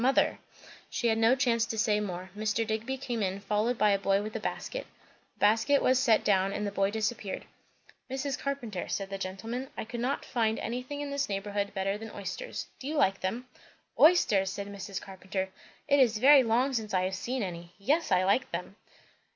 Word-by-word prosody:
Mother! 265 +3 +3 0.2
" - - -19
She 235 - +2
had 225 0 +2
no 230 +3 +5
chance 240 -4 +2
to 225 - -4
say 210 -1 +2
more. 185 -2 -5
Mr. 215 +2 0
Digby 225 +4 -2
came 245 -4 -3
in, 190 0 -1
followed 215 +4 0
by 210 - +4
a 200 - +2
boy 195 +1 +2
with 215 +1 -6
a - - -1
basket. - - -4 0.5
The - - -34
basket 225 +7 +4
was 255 0 +3
set 235 -5 +4
down 195 -1 +2
and 210 - -2
the 200 - -2
boy 195 0 +1
disappeared. 220 -1 -3 0.6
"Mrs. 270 +1 -2
Carpenter," 245 -9 -3
said 195 -1 -3
the 195 - -4
gentleman, 225 +8 -4
"I - - -3
could 235 +1 -6
not 255 +4 -1
find 225 -2 0
anything 250 +5 -4
in 290 -1 -4
this 280 -3 -1
neighbourhood 200 0 -2
better 195 +1 -1
than 225 0 -7
oysters. 455 - -5
Do 265 - -7
you 310 - -2
like 195 -9 +3
them?" 230 +7 -2 0.5
"Oysters!" 215 - +5
said 200 +1 -4
Mrs. 200 -1 -6
Carpenter. 190 0 -4 0.4
"It 285 0 +4
is 235 -5 +4
very 275 +4 +8
long 250 +3 +2
since 220 -4 -2
I 185 - +2
have 185 +1 -1
seen 240 +5 -2
any. 170 -2 -6
Yes, 290 +10 +1
I 185 0 +4
like 200 +7 +2
them." 180 +4 -5
220 Hz, 205 wpm, -29 LUFS, 195-255 Hz, 0.6 s, very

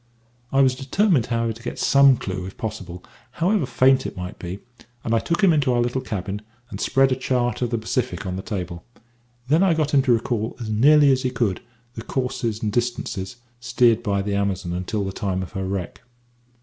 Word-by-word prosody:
I 135 - +4
was 130 -1 +4
determined, 140 - +1
however, 115 -1 0
to 115 - -14
get - - -5
some 140 -2 +5
clue 95 -3 -5
if 95 - -11
possible, 95 -5 -6 0.3
however 175 -2 +1
faint 130 +1 +3
it - - -9
might 90 +2 -6
be; 90 +1 -5 0.5
and 115 - -1
I 115 - +4
took 170 - -1
him 185 -4 +6
into 145 -4 +2
our 120 - +2
little 120 +2 0
cabin, 105 -3 -4 0.3
and - - -6
spread 135 0 +3
a - - +3
chart 125 -2 -1
of 120 - 0
the 115 - -1
Pacific 110 0 -2
on 90 -1 -3
the 95 - -4
table. 90 -5 -5 0.6
Then 155 +6 +3
I 190 -4 +4
got 150 -2 -1
him 140 - +6
to 130 -2 +3
recall, 115 -1 -1
as 110 -3 -4
nearly 145 +6 +5
as 130 -1 +2
he 130 - 0
could, 115 -6 -1 0.3
the 115 - -7
courses 120 -3 -3
and 105 - 0
distances 120 -5 -2 0.2
steered 120 -1 +3
by 100 -3 -1
the 100 0 -2
Amazon 100 -3 -1
until 95 +4 -2
the 95 - -3
time 95 -1 -2
of 90 - -9
her 95 -2 -4
wreck. 95 -2 -4
115 Hz, 210 wpm, -23 LUFS, 100-130 Hz, 0.6 s, him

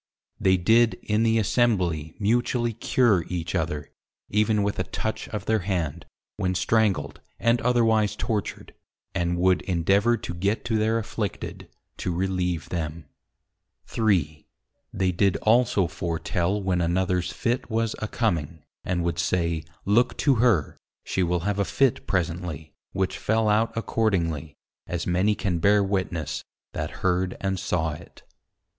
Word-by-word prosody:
They 95 0 +4
did 110 +3 +4
in 105 +1 +1
the 115 0 +3
Assembly 95 -9 +1
mutually 120 +2 +1
Cure 115 -4 +2
each 85 -2 -3
other, 80 -4 -2 0.4
even 105 0 +2
with 100 0 -1
a - - +2
Touch 110 - -4
of 105 -3 -5
their 110 0 +2
Hand, 85 -6 -3 0.3
when 95 -3 0
Strangled, 100 -8 +1 0.2
and 115 +1 +2
otherwise 115 -4 +2
Tortured; 105 -3 -3 0.4
and 85 0 0
would 90 0 +3
endeavour 100 +6 +2
to 90 - -6
get 100 +7 -1
to 110 -2 +1
their 110 +1 +2
Afflicted, 110 -2 -4 0.3
to 90 - -2
relieve 90 -2 -1
them. 80 -2 -4 0.8
3. 85 -9 0 0.4
They 95 -1 0
did 95 0 +2
also 110 -4 +3
foretel 85 +3 -1
when 95 -2 +1
anothers 90 +1 0
Fit 120 0 -2
was 115 0 0
a 110 - -3
coming, 85 - -1 0.2
and 90 -2 -1
would 85 -1 -1
say, 85 -1 0 0.2
Look 115 +6 +3
to 140 - +3
her! 110 - +2 0.3
she 95 - -1
will 90 -1 +1
have 100 +2 -1
a - - +3
Fit 135 +5 +1
presently, 85 -4 -2 0.2
which 95 -1 -1
fell 110 0 +1
out 110 +2 +3
accordingly, 85 -10 -1 0.3
as 85 0 -3
many 95 +4 +2
can 95 -5 -1
bear 100 +4 +4
witness, 90 -6 -2 0.3
that - - -3 0.2
heard 90 0 +1
and 95 -1 -1
saw 85 -4 0
it. 75 - -12
95 Hz, 145 wpm, -25 LUFS, 85-110 Hz, 0.8 s, They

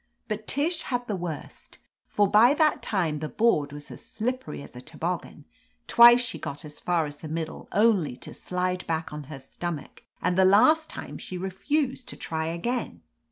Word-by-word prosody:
But 215 0 -4
Tish 320 +4 +1
had 245 -1 -2
the 210 - -1
worst, 170 -4 -7 0.3
for 205 -1 +2
by 230 +8 +6
that 305 -1 +3
time 165 -7 -1
the 155 0 -4
board 185 -11 +2
was 145 0 -9
as - - -11
slip 250 +4 -3
pery - - -7
as - - -13
a 125 - -8
toboggan; 165 +1 -5 0.4
twice 240 +1 +8
she 245 +1 -2
got 145 +2 -6
as 150 0 -9
far 170 -3 +1
as 145 0 -7
the 155 - -8
middle, 160 +1 -5
only 200 - +2
to - - -9
slide 180 0 -3
back 160 -1 -2
on 150 -1 -6
her 145 +1 -8
stomach, 150 +4 -6 0.2
and 180 - 0
the 190 - +5
last 255 +12 +5
time - - -7
she 185 - -6
refused 255 - -2
to - - -6
try 160 0 -3
again. 235 +10 -3
185 Hz, 190 wpm, -26 LUFS, 155-235 Hz, 0.4 s, twice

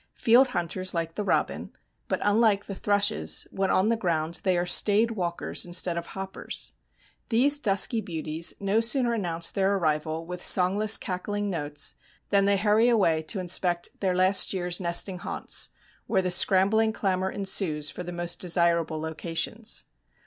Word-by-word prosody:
Field 245 +4 +4
hunters 185 -3 -3
like 165 -1 -2
the 210 - -4
robin, - - -1 0.4
but - - -2
unlike 205 -1 +2
the 200 - -6
thrushes, 205 +1 +1
when 195 0 -1
on 190 +4 +2
the 230 - +2
ground 170 -5 -2
they 185 -2 +1
are 175 - 0
staid 210 +5 +3
walkers 175 -5 -2
instead 175 0 0
of 170 0 -5
hoppers. 190 0 -6 0.6
These 280 +5 +4
dusky 220 -1 +1
beauties 165 -3 -2
no 200 +2 +1
sooner 235 +1 +1
announce 170 -6 -1
their 195 0 +1
arrival 160 -2 -1
with 180 +1 -7
songless 200 +4 +4
cackling 205 +2 -4
notes 150 -4 -3 0.4
than 200 -1 +3
they 200 0 +3
hurry 215 +4 +3
away 180 -9 +2
to 195 - -1
inspect 175 -1 -1
their 185 -2 0
last 185 +2 +3
year's 180 0 -2
nesting 180 +1 0
haunts, - - -3 0.4
where 190 -4 0
scrambling 195 +4 +3
clamor 190 -3 -1
ensues 190 -7 0
for - - -8
the 175 0 -6
most 175 0 -3
desirable 170 -2 +1
locations. 165 +8 -2
185 Hz, 155 wpm, -26 LUFS, 170-205 Hz, 0.6 s, Field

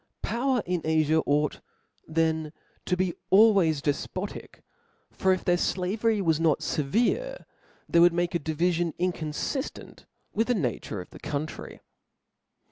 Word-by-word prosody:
Po^ir^r 250 0 0
in 180 -1 -1
Afia. 160 0 +2
ought 150 +1 +1 0.5
tben 160 -1 0 0.4
to 180 - +1
be 185 -1 0 0.2
always 190 -8 +5
def 145 -2 -1
potic: - - -6 0.5
for 190 - +1
if 185 - 0
their 175 0 +3
flavdry 205 +4 0
was 160 -3 +2
not 165 -2 +2
feverc^ 245 - 0 0.4
they 170 - +3
Would 175 +1 +7
foon - - -7
make 175 0 0
a 170 - +1
diVifidcii 165 +2 0
incotofifteot 180 - -3 0.3
with 225 - +1
the 245 - +2
nature 120 - -3
of 90 - -13
thd - - -13
country. 150 +1 -5
170 Hz, 140 wpm, -27 LUFS, 155-195 Hz, 0.5 s, Would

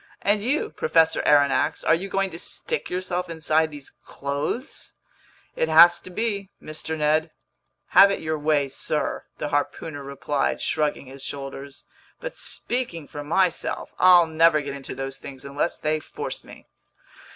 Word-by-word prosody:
"And 205 +1 +3
you, 280 +7 0
Professor 160 0 +2
Aronnax, 145 -2 +3
are - - +4
you 185 +4 -1
going 195 -1 0
to 165 - -8
stick 470 - -4
yourself 180 -1 -3
inside 160 -1 +1
these 145 -3 -11
clothes?" 140 - -4 0.6
"It 160 - 0
has 170 +2 +8
to 185 - -12
be, 200 0 -2
Mr. 155 +1 -6
Ned." 155 +2 +2 0.6
"Have 200 - +8
it 200 - -1
your 155 -1 -2
way, 145 -2 +2
sir," 150 +3 -2
the 150 - -3
harpooner 145 +1 -2
replied, 140 +1 -2
shrugging 150 -2 -1
his 135 +1 -11
shoulders. 140 0 -7 0.4
"But - - -6
speaking 205 - -2
for 145 -1 -7
myself, 175 +3 0
I'll 180 -2 +7
never 160 -1 +4
get 140 -1 -5
into 140 -2 -7
those 135 0 -5
things 135 -1 -10
unless 140 +4 -1
they 155 0 0
force - - -6
me!" - - -14
155 Hz, 150 wpm, -24 LUFS, 145-175 Hz, 0.6 s, has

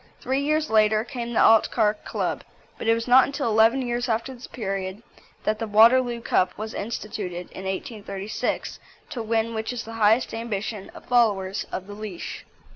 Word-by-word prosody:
Three 265 +1 -1
years 305 0 0
later 215 0 +4
came 235 -2 -5
the - - +2
Altcar 220 -1 +4
Club. - - -2 0.4
But - - -4
it 225 - +5
was 230 +1 -4
not 255 +1 +7
until 280 -2 -2
eleven 225 +4 +4
years 240 0 -2
after 230 +4 -1
this 245 -1 -11
period 195 -2 -4 0.4
that 215 0 0
the 225 - -3
Waterloo 235 +3 +5
Cup 185 -5 +1
was 215 +1 -5
instituted 200 -5 -5
(in 190 - -8
1836), 200 +1 -4 0.3
to 240 - -4
win 225 +1 0
which 220 +1 -3
is 245 -2 -4
the 225 - -9
highest 220 +4 +3
ambition 215 -2 -4
of - - -12
followers 205 -6 +1
of 185 - -4
the 205 - -9
leash. 205 -4 -7
225 Hz, 175 wpm, -25 LUFS, 210-240 Hz, 0.4 s, not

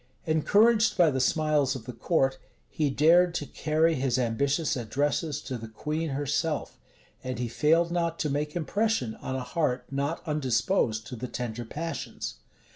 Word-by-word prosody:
Encouraged 210 +7 +4
by 170 -4 +5
the 130 - -1
smiles 145 0 +2
of 120 -4 -7
the 125 - -6
court, 135 +2 +1 0.3
he 150 -2 0
dared 170 +5 +4
to 145 - -2
carry 155 +4 +1
his 130 -3 0
ambitious 140 +6 0
addresses 145 +5 -1
to 125 -2 -5
the 115 - -7
queen 155 +8 -3
herself; 145 +3 -2 0.4
and 130 -2 -4
he 120 0 -2
failed 165 +7 +2
not 170 -1 0
to - - -1
make 150 +2 -2
impression 175 - 0
on 130 - -5
a 130 - -3
heart 125 -2 -1
not 140 +4 -2
undisposed 125 - +1
to 125 - -7
the 125 +2 -5
tender 120 -1 -5
passions. 160 +4 -5
145 Hz, 160 wpm, -28 LUFS, 125-165 Hz, 0.4 s, by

